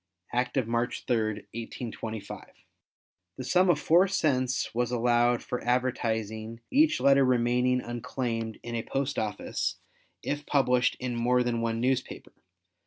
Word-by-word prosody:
Act 125 Hz, +3 st, 0 dB
of 125 Hz, -4 st, +1 dB
March 120 Hz, +1 st, -1 dB
3, 120 Hz, -, +2 dB, 0.4 s
1825. 115 Hz, -1 st, -6 dB, 0.9 s
The 130 Hz, -, -5 dB
sum 180 Hz, +6 st, +3 dB
of 160 Hz, -4 st, +4 dB
4 175 Hz, +6 st, +4 dB
cents 130 Hz, -9 st, 0 dB
was 120 Hz, 0 st, 0 dB
allowed 120 Hz, 0 st, +2 dB
for 125 Hz, -, -4 dB
advertising 115 Hz, -3 st, -1 dB
each 300 Hz, +2 st, +4 dB
letter 140 Hz, 0 st, +5 dB
remaining 125 Hz, 0 st, +2 dB
unclaimed 115 Hz, -2 st, -4 dB
in 120 Hz, -, -6 dB
a 115 Hz, -, -1 dB
post 135 Hz, +3 st, -2 dB
office 105 Hz, -1 st, -2 dB, 0.5 s
if 145 Hz, 0 st, -3 dB
published 125 Hz, -3 st, +2 dB
in 125 Hz, -1 st, -3 dB
more 125 Hz, +1 st, +2 dB
than 120 Hz, -1 st, -1 dB
one 115 Hz, 0 st, -1 dB
newspaper. 130 Hz, +1 st, -2 dB
125 Hz, 135 wpm, -28 LUFS, 115-130 Hz, 0.9 s, letter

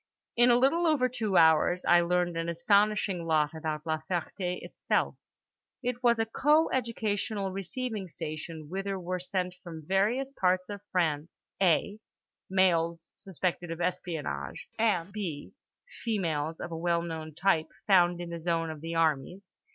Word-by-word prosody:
In 240 Hz, +1 st, +5 dB
a 240 Hz, -, +6 dB
little 320 Hz, +7 st, +3 dB
over 290 Hz, -5 st, +3 dB
two 220 Hz, -6 st, -1 dB
hours 160 Hz, +2 st, +4 dB
I 175 Hz, 0 st, +6 dB
learned 175 Hz, 0 st, +1 dB
an 165 Hz, 0 st, -2 dB
astonishing 195 Hz, 0 st, +2 dB
lot 155 Hz, -1 st, +2 dB
about 155 Hz, -1 st, -4 dB
La 160 Hz, -1 st, 0 dB
Ferté 180 Hz, +1 st, -2 dB
itself: -, -, -1 dB, 0.7 s
it 245 Hz, 0 st, -2 dB
was 240 Hz, -2 st, +4 dB
a 225 Hz, -, +1 dB
co 300 Hz, +8 st, +3 dB
educational 215 Hz, -5 st, -1 dB
receiving 195 Hz, +1 st, -4 dB
station 155 Hz, 0 st, -6 dB
whither 195 Hz, +3 st, -3 dB
were 180 Hz, +1 st, -3 dB
sent 180 Hz, 0 st, -2 dB
from 160 Hz, -3 st, -9 dB
various 220 Hz, -, +1 dB
parts 185 Hz, -4 st, +1 dB
of 205 Hz, -1 st, -6 dB
France 165 Hz, -3 st, -1 dB, 0.2 s
(a) 195 Hz, +3 st, +2 dB, 0.5 s
males 170 Hz, -3 st, +1 dB
suspected 180 Hz, -2 st, -3 dB
of 165 Hz, 0 st, -5 dB
espionage 165 Hz, -, -3 dB
and 195 Hz, -5 st, +1 dB
(b) 175 Hz, -9 st, -5 dB, 0.5 s
females 165 Hz, -8 st, -1 dB
of -, -, -6 dB
a -, -, -3 dB
well 170 Hz, 0 st, +1 dB
known 160 Hz, -2 st, -6 dB
type 165 Hz, -3 st, +2 dB, 0.2 s
found 175 Hz, -3 st, +4 dB
in 175 Hz, -1 st, -6 dB
the 170 Hz, -1 st, -5 dB
zone 165 Hz, -1 st, 0 dB
of 155 Hz, -2 st, -9 dB
the 165 Hz, +1 st, -4 dB
armies. 165 Hz, +3 st, 0 dB
180 Hz, 150 wpm, -29 LUFS, 165-205 Hz, 0.7 s, a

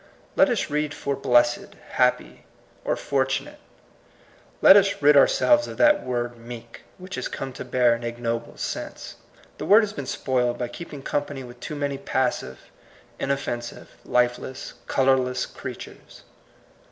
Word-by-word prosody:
Let 285 Hz, -, +5 dB
us 230 Hz, -10 st, -1 dB
read 150 Hz, 0 st, -1 dB
for 140 Hz, -1 st, -2 dB
blessed^ 120 Hz, -2 st, +2 dB, 0.2 s
bappy -, -, +1 dB, 0.4 s
or -, -, 0 dB
fortunate; -, -, -2 dB, 1.0 s
let -, -, +9 dB
us 200 Hz, 0 st, +4 dB
rid 150 Hz, +1 st, +5 dB
our 140 Hz, -, +8 dB
selves 300 Hz, 0 st, +3 dB
of -, -, -8 dB
that 300 Hz, -1 st, +4 dB
word 120 Hz, -1 st, -3 dB
meek^ 115 Hz, 0 st, -10 dB, 0.2 s
which 185 Hz, +1 st, -10 dB
has 130 Hz, -, -3 dB
come 135 Hz, -1 st, -6 dB
to -, -, -7 dB
bear 125 Hz, -1 st, +3 dB
an 115 Hz, 0 st, -4 dB
ignoble 115 Hz, 0 st, -4 dB
sense. -, -, -6 dB, 0.4 s
The -, -, -4 dB
word 210 Hz, +3 st, +8 dB
has 210 Hz, -1 st, -3 dB
been 140 Hz, -9 st, -6 dB
spoiled 125 Hz, -2 st, 0 dB
by 120 Hz, -1 st, -3 dB
keeping 145 Hz, 0 st, -9 dB
company 145 Hz, -2 st, -3 dB
with 120 Hz, 0 st, -12 dB
too 150 Hz, -, -6 dB
many 140 Hz, -1 st, -2 dB
passive, 125 Hz, -, -2 dB, 0.5 s
inoffensive, 130 Hz, -4 st, -3 dB
lifeless, 125 Hz, +1 st, -1 dB
colorless 130 Hz, -1 st, +2 dB
creatures. -, -, -10 dB
130 Hz, 145 wpm, -24 LUFS, 120-145 Hz, 1.0 s, let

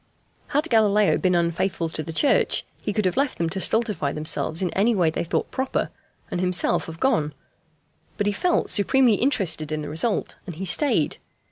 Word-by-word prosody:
Had 300 Hz, +3 st, +1 dB
Galileo 210 Hz, -4 st, +3 dB
been 180 Hz, -1 st, +1 dB
unfaithful 170 Hz, 0 st, 0 dB
to 155 Hz, -, -3 dB
the 155 Hz, -, -6 dB
Church 280 Hz, -, +2 dB, 0.2 s
he 210 Hz, -, -2 dB
could 210 Hz, 0 st, -1 dB
have 185 Hz, -, +1 dB
left 275 Hz, 0 st, 0 dB
them 165 Hz, -1 st, -1 dB
to 195 Hz, -, -2 dB
stultify 210 Hz, -, 0 dB
themselves 155 Hz, +3 st, 0 dB
in 180 Hz, -, -1 dB
any 220 Hz, +4 st, +2 dB
way 170 Hz, -5 st, +2 dB
they 160 Hz, -, -2 dB
thought 170 Hz, -, -2 dB
proper, 265 Hz, 0 st, -2 dB, 0.4 s
and 175 Hz, -, -2 dB
himself 180 Hz, -1 st, +2 dB
have 165 Hz, 0 st, -9 dB
gone; 155 Hz, -, +1 dB, 0.8 s
but 205 Hz, -, -1 dB
he 205 Hz, -, +1 dB
felt 355 Hz, -, 0 dB
supremely 240 Hz, +3 st, +3 dB
interested 185 Hz, -, 0 dB
in 155 Hz, 0 st, -2 dB
the -, -, -6 dB
result, 175 Hz, +8 st, -2 dB
and 175 Hz, -, -6 dB
he 190 Hz, +4 st, -5 dB
stayed. 220 Hz, -, +1 dB
190 Hz, 190 wpm, -23 LUFS, 165-225 Hz, 0.8 s, Galileo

